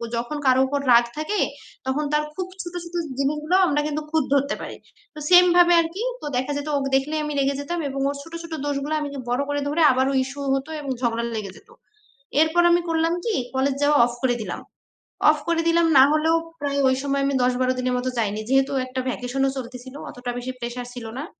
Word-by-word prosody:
যখন 240 +6 -3
কারো 260 0 +5
উপর 285 +1 -1
রাগ 235 0 +7
থাকে 360 +7 -1 0.5
তখন 265 +3 0
তার 300 0 +2
খুব 370 -1 -3
ছোট 345 0 -8
ছোট 345 0 -10 0.2
জিনিসগুলো 300 +5 0
আমরা 295 -2 +1
কিন্তু 305 0 -2
খুঁত 320 -3 +2
ধরতে 280 0 +1
পারি। - - -7 0.4
তো - - -8
same 360 0 +8
ভাবে 350 0 +6
আরকি। 335 +6 -5 0.2
তো - - -7
দেখা 260 +3 -1
যেত 290 +1 -5
ওকে 275 -1 -1
দেখলেই 300 +3 -2
আমি 300 - -3
রেগে 275 0 +1
যেতাম। 340 +4 -3
এবং 275 0 -4
ওর 285 - -3
ছোট, 330 - -14
ছোট 335 -1 -8
দোষগুলো 285 +1 -2
আমি 290 - -3 0.2
বড় 250 +3 +1
করে 290 0 -1
ধরে 300 +3 0
আবারও 260 +2 +1
issue 275 +2 -7
হতো 270 +3 -4
এবং 275 -2 -4
ঝগড়া 235 -1 0
লেগে 200 -3 -5
যেত। - - -20 0.7
এরপর 320 +2 +3
আমি 345 0 +4
করলাম 330 +1 +1
কি 450 - 0 0.2
college 265 +1 +1
যাওয়া 290 0 +4
off 240 0 -5
করে 245 -2 +2
দিলাম। - - -5 0.7
Off 305 - +3
করে 335 -1 +2
দিলাম 335 0 +4
না 265 - +9
হলেও 315 +2 +3 0.3
প্রায় 280 -1 -1
ওই 260 - +3
সময় 280 0 0
আমি 280 - 0
১০ 250 0 +2
১২ 255 0 +2
দিনের 255 0 0
মতো 255 +1 -1
যাইনি। 215 -1 -1
যেহেতু 270 +1 +3
একটা 255 0 -5
vacation 250 +1 -3
-ও - - +2
চলতেছিল, 255 +1 -8
অতটা 245 0 -5
বেশি 245 +1 -4
pressure 245 0 -5
ছিল 230 -2 -7
না। 295 - -4
280 Hz, 215 wpm, -23 LUFS, 255-310 Hz, 0.7 s, না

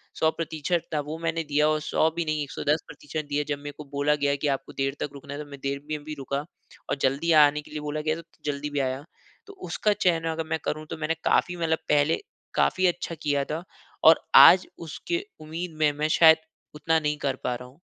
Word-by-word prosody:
100% 160 +1 0
था 150 - +1
वो 160 - -4
मैंने 165 0 -1
दिया 150 +1 +2
और 155 0 +1
100 155 +1 +2
भी 170 -1 -1
नहीं 155 -1 -1
110% 150 +1 -3
दिया 145 +1 0
जब 145 - 0
मेरे 145 0 -7
को 150 - -7
बोला 145 +1 +2
गया 145 -1 +1
है 140 - 0
कि 150 - -2
आपको 135 - -11
देर 135 0 0
तक - - -2
रुकना 140 0 -9
है 145 - -6
तो 150 - -6
मैं 140 - -9
देर 140 0 -1
में 150 -1 -3
भी 155 +1 -6
रुका 140 +1 -3 0.5
और - - +1
जल्दी 140 +6 +1
आने 150 +1 +2
के - - -17
लिए 150 - -4
बोला 150 +1 -3
गया 155 +1 0
तो 165 - -9 0.2
जल्दी 145 0 -2
भी 145 -1 -2
आया। 130 +1 -1 0.4
तो 400 - -11 0.2
उसका 210 -1 +1
चयन 165 -3 +2
अगर 160 0 -3
मैं 160 - +1
करूँ 155 +1 -2
तो - - -4
मैंने 155 +1 -1
काफ़ी 180 0 +2
मतलब 160 -1 0
पहले 150 +2 +3 0.4
काफ़ी 185 0 +3
अच्छा 175 -1 -2
किया 145 -2 +1
था। 160 +4 -4 0.4
और 160 +1 +7
आज 185 +1 +9 0.2
उसके 345 - -3 0.2
उम्मीद 160 +2 -5
में 150 -1 +4
मैं 155 - +2
शायद 160 -1 +9 0.4
उतना 160 +1 +1
नहीं 150 -1 -1
कर 140 -3 -1
पा 125 - 0
रहा 125 +1 -9
हूँ। 135 +6 -22
150 Hz, 230 wpm, -26 LUFS, 145-160 Hz, 0.5 s, आज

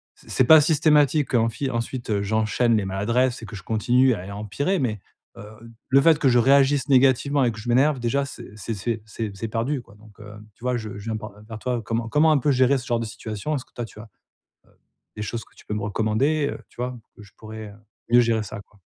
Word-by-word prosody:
c'est - - -20
c'est 130 - +3
pas 160 +2 +8
systématique, 150 -2 +3
enfi 115 +4 0
ensuite, 120 +1 -4
heu, 100 -1 +1
j'enchaîne 110 +2 +1
les 100 - -1
maladresses 115 +7 0
et - - -7
que 110 - -9
je 90 - -11
continue 125 +4 +2
à 90 - -8
et 100 - -7
empirer 110 - -2
mais, 110 -6 -1 0.4
heu, - - -9 0.5
le 135 +1 +6
fait 160 0 +5
que 135 - +3
je 120 - +4
réagisse 140 +3 +4
négativement 135 +1 +3
et 120 - +1
que 110 - -9
je 110 - -9
m'énerve 135 +3 +3
déjà 135 +4 0
c'est 140 - -10
c'est 110 +2 -4
c'est 110 +2 -3
c'est 110 -1 -5
c'est 115 +1 -4
perdu 125 +5 -2
quoi, 105 -3 -19
donc, 105 -1 -18
hem, 105 0 -12
tu - - -21
vois, 125 -1 +1
je 105 -3 -7
je - - -10
viens 110 -1 -2
par 105 -1 -9 0.2
vers 110 -1 -7
toi. 125 -1 -2
Comment 115 +1 -2
comment 155 +5 +4
un 150 - +4
peu 145 +3 +1
gérer 130 +1 +3
ce 125 - -10
genre 120 -1 0
de - - -3
situation? 110 +5 -5
Est-ce 130 - -5
que - - -34
toi 120 - -4
tu 110 - -14
as, - - -8
heu, 115 - -14 1.1
des - - -4
choses 115 +1 -5
que - - -27
tu - - -18
peux 105 - -4
me 105 - -3
recommander, 120 +9 0
heu, - - -7
tu - - -26
vois, 125 0 -3 0.2
où 105 - -12
je 100 - -17
pourrais, 110 0 -9
heu, 100 - -14 0.3
mieux 120 - +6
gérer 115 -2 +1
ça, 105 +1 -8
quoi? 100 0 -25
115 Hz, 255 wpm, -23 LUFS, 110-135 Hz, 1.1 s, pas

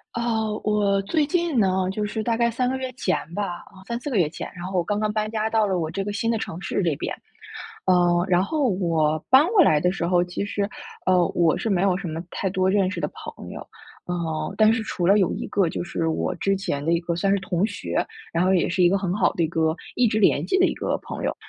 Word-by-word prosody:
呃， 235 - -1 0.4
我 205 -2 +2
最 300 +9 +1
近 335 -3 0
呢， 190 -2 +2
就 210 +2 -2
是 220 +1 -3
大 230 +1 0
概 235 0 +3
3 250 +2 0
个 265 - -1
月 260 -1 -4
前 200 -7 0 0.2
吧， 205 +2 -2 0.2
啊， 190 -1 -16
3 235 0 -3
4 285 +3 -5
个 235 - +1
月 170 -5 +3
前， 160 - -6
然 175 - -8
后 185 +1 -3
我 175 - +2
刚 205 +4 -1
刚 215 0 0
搬 215 0 -1
家 220 0 -1
到 220 -1 +2
了 190 -3 0
我 160 -2 -2
这 195 +4 -3
个 205 - -3
新 220 +3 -1
的 230 - +1
城 175 -4 -6
市 - - -1
里 165 -5 +1
边。 - - -4 0.7
呃， 175 -1 +3
然 175 0 +4
后 285 +4 0
我 165 -5 +1
搬 265 +3 +7
过 400 0 +4
来 155 - +4
的 180 +3 +2
时 180 -3 -3
候， 175 0 +3
其 180 +3 -4
实， 205 -1 -2 0.4
呃， 180 -2 +4
我 165 -3 +2
是 225 - -2
没 190 -4 +2
有 190 -2 +2
什 195 -1 -5
么 160 0 -4
太 195 - -2
多 185 0 +1
认 195 -1 +2
识 200 - -4
的 - - -1
朋 - - -10
友， - - -7 0.5
呃， 160 -3 -3
但 215 0 +6
是 225 - -1
除 180 -5 -3
了 200 +2 +6
有 190 - +2
一 - - -4
个 195 -4 +1
就 - - -4
是 165 -1 -2
我 160 - -1
之 195 0 0
前 165 -7 -3
的 165 - +2
一 170 - +2
个 170 0 -2
算 195 +3 +1
是 - - +2
同 190 -1 0
学， 215 - -2 0.3
然 170 +2 +1
后 190 - +3
也 180 - +2
是 180 +1 0
一 175 - +6
个 195 - +2
很 185 -2 -2
好 210 - +2
的 170 - 0
一 160 - +1
个 160 -1 +1 0.2
一 250 - +4
直 215 - 0
联 205 - +3
系 380 - +2
的 370 - +6
一 - - -1
个 - - -1
朋 - - -6
友。 - - -1
195 Hz, 280 characters per minute, -24 LUFS, 175-215 Hz, 0.7 s, 搬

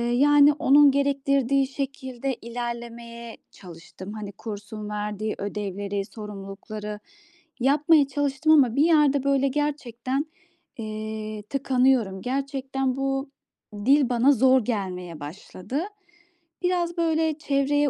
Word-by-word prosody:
yani, 290 +2 +6
onun 285 0 +6
gerektirdiği 275 -1 +1
şekilde 270 -1 -4
ilerlemeye 235 0 -7
çalıştım. 185 +2 -11
Hani, 210 -2 -6
kursun 210 0 -7
verdiği 210 0 -3
ödevleri, 200 -1 -3
sorumlulukları 210 0 -8 0.6
yapmaya 290 +2 +4
çalıştım 290 +2 0
ama 255 -6 +5
bir 285 - +4
yerde, 295 -4 +4
böyle, 275 -1 +3
gerçekten, 270 -2 -2 0.5
eee, 215 -1 -5
tıkanıyorum. 255 -7 +2
Gerçekten 270 0 -2
bu 270 0 -1 0.6
dil 275 -1 +5
bana 245 +3 +4
zor 260 -1 +4
gelmeye 180 -7 -3
başladı. 185 - -6 0.8
Biraz, 350 -1 0
böyle, 320 -2 +1
çevreye 290 0 +1
255 Hz, 100 wpm, -25 LUFS, 215-280 Hz, 0.8 s, yani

